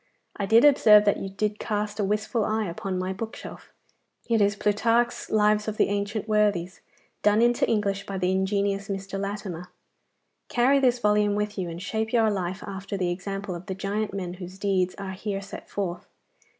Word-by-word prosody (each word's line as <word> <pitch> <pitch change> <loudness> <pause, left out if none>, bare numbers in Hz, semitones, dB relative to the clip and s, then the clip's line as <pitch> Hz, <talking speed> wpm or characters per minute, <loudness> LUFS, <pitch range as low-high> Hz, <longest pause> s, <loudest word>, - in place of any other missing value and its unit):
I 200 - -3
did 230 +6 +6
observe 215 -7 +7
that 205 - +3
you 195 - -4
did 210 +2 -2
cast 210 0 -2
a - - +2
wistful 215 +3 0
eye 215 0 0
upon 185 +2 -4
my 185 +1 -2
bookshelf. 220 +4 -8 0.6
It 230 -2 +2
is 205 0 +3
Plutarch's 230 +4 +1
lives 210 0 +3
of 215 0 -3
the - - +3
ancient 205 +1 -2
worthies, 205 -4 +1 0.4
done 210 +1 +4
into 240 +1 +3
English 200 -2 0
by 195 - -4
the 185 0 +1
ingenious 200 +1 0
Mr. 195 0 -4
Latimer. 195 -3 -5 0.8
Carry 260 +3 +3
this 250 -2 +3
volume 210 -2 +2
with 210 0 -2
you, 185 -3 -3
and 165 0 -6
shape 220 +1 -2
your 225 -2 +4
life 185 -1 -3
after 195 0 -5
the 180 -2 0
example 195 +2 -4
of 175 +1 -8
the 190 - -3
giant 205 +3 -2
men 185 -3 -4
whose 180 0 -9
deeds 190 -2 0
are 195 -1 -6
here 195 +1 -4
set 195 0 -10
forth. 180 -3 -4
205 Hz, 185 wpm, -26 LUFS, 190-215 Hz, 0.8 s, observe